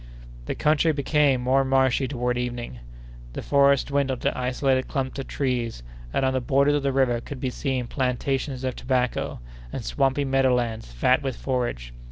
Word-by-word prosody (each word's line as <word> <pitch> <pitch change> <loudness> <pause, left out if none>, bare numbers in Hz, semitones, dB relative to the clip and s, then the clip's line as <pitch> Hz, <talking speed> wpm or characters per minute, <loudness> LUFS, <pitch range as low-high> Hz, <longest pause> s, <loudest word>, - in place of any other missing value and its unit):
The - - -2
country 155 +2 +3
became 140 -2 +2
more 130 +2 +3
marshy 130 0 +2
toward 125 -2 -1
evening; 120 - -4 0.5
the - - -5
forests 140 -1 +4
dwindled 140 -2 0
to - - 0
isolated 130 +1 0
clumps 135 -2 -3
of 135 - -5
trees; 120 - -2 0.3
and 135 - +1
on 130 - +1
the 130 - 0
borders 140 +3 +3
of 145 - +1
the 140 0 0
river 130 -3 +2
could 140 +1 -8
be 130 -1 -2
seen 130 -2 -2
plantations 130 +1 -2
of 130 -1 -2
tobacco, 125 - -1 0.3
and - - -5
swampy 135 - +1
meadow 135 -1 +3
lands 115 - -3
fat 125 - +2
with 135 -3 -3
forage. 120 - -3
130 Hz, 175 wpm, -25 LUFS, 125-135 Hz, 0.5 s, forests